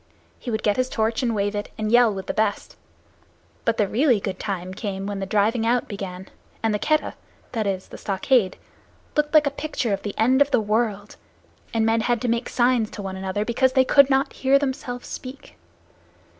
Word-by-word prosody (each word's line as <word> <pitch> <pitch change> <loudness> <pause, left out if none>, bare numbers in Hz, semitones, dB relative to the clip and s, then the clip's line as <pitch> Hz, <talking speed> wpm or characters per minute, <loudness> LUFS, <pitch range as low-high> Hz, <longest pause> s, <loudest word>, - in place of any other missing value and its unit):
He 250 - -6
would 220 -2 -2
get 205 -1 +2
his 255 0 +1
torch 225 0 0
and 235 -3 0
wave 205 0 0
it, 205 0 -4
and 215 -1 -2
yell 240 -1 +6
with 195 -1 -5
the - - -3
best. 215 -2 -1 0.9
But 230 -1 +1
the 205 - +2
really 245 +1 +3
good 190 -2 -4
time 185 -3 -4
came 195 -1 -4
when 200 -1 -4
the 195 - -4
driving 215 +3 +1
out 240 +2 +1
began, 190 -2 -7 0.4
and 225 -1 +2
the 210 - 0
Keddah 305 +5 +1 0.4
that 220 -4 -1
is, 190 -1 -2
the - - -10
stockade 195 +1 +1 0.6
looked 300 -1 +1
like 305 -1 +7
a 285 - +1
picture 280 -6 -2
of 195 - -2
the 205 - -6
end 255 +5 +3
of 285 - +5
the 250 - +3
world, 210 -1 -1 0.5
and 225 -1 +1
men 225 0 +2
had 240 +1 +1
to - - 0
make 235 +1 -1
signs 240 -3 +2
to 205 - -8
one 190 -1 -5
another, 190 +2 -2
because 260 +3 +2
they 260 -1 +4
could 280 +1 +6
not 270 0 +1
hear 270 +1 +3
themselves 260 -3 -3
speak. 260 +2 -9
225 Hz, 210 wpm, -23 LUFS, 205-255 Hz, 0.9 s, like